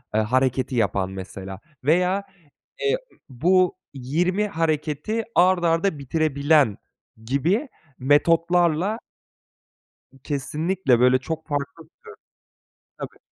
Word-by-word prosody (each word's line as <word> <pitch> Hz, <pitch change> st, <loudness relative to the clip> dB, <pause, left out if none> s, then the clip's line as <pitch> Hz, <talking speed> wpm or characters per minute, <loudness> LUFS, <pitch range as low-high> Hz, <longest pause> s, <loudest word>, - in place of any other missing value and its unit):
eee, 110 Hz, -, +4 dB
hareketi 130 Hz, +2 st, 0 dB
yapan 100 Hz, -4 st, 0 dB
mesela. 95 Hz, 0 st, -8 dB, 0.2 s
Veya, 180 Hz, +6 st, +2 dB, 0.6 s
eee, 440 Hz, +2 st, +2 dB, 0.2 s
ımm, -, -, -26 dB
bu 180 Hz, +8 st, +2 dB, 0.2 s
20 175 Hz, +10 st, 0 dB
hareketi 160 Hz, +6 st, -1 dB
art 180 Hz, 0 st, +4 dB
arda 165 Hz, 0 st, +1 dB
bitirebilen 145 Hz, -4 st, +2 dB, 0.5 s
gibi 170 Hz, -, 0 dB, 0.3 s
metotlarla 170 Hz, -, +2 dB, 1.3 s
Kesinlikle, 150 Hz, 0 st, 0 dB
böyle, 125 Hz, +1 st, +4 dB
çok 160 Hz, +3 st, -6 dB
farklı 145 Hz, +2 st, -4 dB
bir 160 Hz, -, -25 dB
tür. 470 Hz, -, -50 dB, 0.9 s
Tabii. -, -, -8 dB
155 Hz, 100 wpm, -23 LUFS, 130-180 Hz, 1.3 s, eee